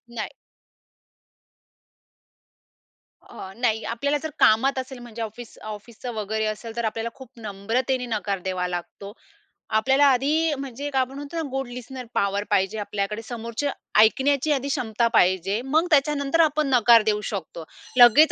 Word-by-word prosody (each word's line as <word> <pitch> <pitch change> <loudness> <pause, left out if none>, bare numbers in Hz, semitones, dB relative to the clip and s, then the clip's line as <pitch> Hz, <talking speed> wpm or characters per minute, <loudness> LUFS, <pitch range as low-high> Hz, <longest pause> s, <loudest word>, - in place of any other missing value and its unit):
नाही. 220 - -3 2.9
अ, 190 - -10
नाही. 225 -2 0
आपल्याला 280 +6 -1
जर 315 - -2
कामात 260 +5 +4
असेल, 260 0 -7
म्हणजे 235 -1 -9
ऑफिस 225 +1 -7
ऑफिसचं 215 +3 -7
वगैरे 220 0 -2
असेल, 215 +1 -5
तर 235 -1 -2
आपल्याला 225 +1 -2
खूप 265 -3 -12
नम्रतेने 230 +5 -2
नकार 205 -4 -2
द्यावा 185 -1 -1
लागतो. 180 +3 -6 0.6
आपल्याला 265 +6 +4
आधी 300 +6 +2
अ, - - -1
म्हणजे 275 +1 -5
काय 270 -2 +1
आपण 260 +1 -4
म्हणतो 290 +3 -8
ना, - - 0
गुड 270 0 -3
लिस्टनर 250 +1 -8
पॉवर 200 0 0
पाहिजे 195 +3 +1
आपल्याकडे. 210 +1 -3
समोरचं 235 +4 -4 0.3
ऐकण्याची 275 +6 +4
आधी 275 -1 0
क्षमता 235 -4 0
पाहिजे. 190 +2 +3
मग 305 +7 +1
त्याच्यानंतर 290 +1 +2
आपण 305 -2 +2
नकार 235 -3 +6
देऊ 210 0 +1
शकतो. 175 -5 -5 0.3
लगेच 245 +6 +8
235 Hz, 145 wpm, -24 LUFS, 215-270 Hz, 2.9 s, लगेच